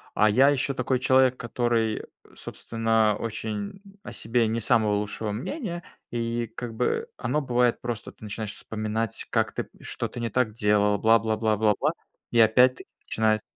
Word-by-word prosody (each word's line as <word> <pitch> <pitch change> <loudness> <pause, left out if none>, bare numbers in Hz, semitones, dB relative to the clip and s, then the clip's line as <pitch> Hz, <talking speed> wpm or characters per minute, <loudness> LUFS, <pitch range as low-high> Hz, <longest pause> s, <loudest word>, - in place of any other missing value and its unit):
а 105 0 +5
я 130 +7 +5
еще 140 0 0
такой 130 -1 0
человек, 130 0 +4
который, 115 -2 0 0.3
собственно, 115 -2 0
очень 110 - -4 0.2
о - - -8
себе 115 +1 0
не 115 +1 -1
самого 110 -1 +2
лучшего 105 +1 -2
мнения. 175 - -4 0.3
И 115 0 -2
как 120 -2 -5
бы, 290 - 0
оно 150 - 0
бывает 125 -3 +1
просто, 120 -3 -4
ты - - -19
начинаешь 105 0 -5
вспоминать, 110 0 -3
как - - +1
ты - - -4
что-то - - -5
не 115 -1 -2
так 120 -3 0
делал, 105 -1 +2
бла 115 +1 +5
бла 110 0 -1
бла 110 -1 +1
бла 105 -1 +3
бла, - - +2 0.4
и 120 - +2
опять 125 +3 +6
ты - - -11 0.2
начинаешь 110 -1 +1
115 Hz, 170 wpm, -26 LUFS, 110-125 Hz, 0.4 s, опять